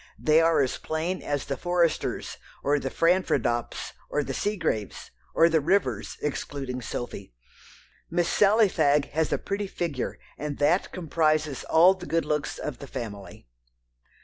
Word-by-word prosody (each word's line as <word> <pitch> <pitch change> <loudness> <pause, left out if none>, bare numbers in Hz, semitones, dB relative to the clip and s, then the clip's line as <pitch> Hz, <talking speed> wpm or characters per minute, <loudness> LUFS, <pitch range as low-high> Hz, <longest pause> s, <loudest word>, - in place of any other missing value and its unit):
They 155 +1 +4
are 165 -2 +4
as 130 - -2
plain 160 +4 -2
as 145 -1 -2
the 140 - -2
Foresters, 175 -2 0 0.3
or 145 +1 +2
the 135 - -3
Franfraddops, 155 -9 +1 0.2
or 150 - 0
the 135 - -4
Seagraves, 170 - -2 0.2
or 165 - +6
the 160 -2 +2
Rivers, 140 - 0
excluding 135 -3 -3
Sophy. 100 - -6 0.7
Miss 170 0 +1
Sally 210 +3 +5
Fagg 150 -5 +2
has 160 +1 0
a - - +2
pretty 200 0 -3
figure, 165 -8 -3 0.2
and 145 -1 -4
that 155 +6 +2
comprises 155 -4 0
all 175 +4 +6
the 185 -2 -10
good 165 0 +1
looks 150 -1 -1
of 150 -4 -5
the 140 - -8
family." 100 - -7
155 Hz, 145 wpm, -26 LUFS, 135-175 Hz, 0.7 s, or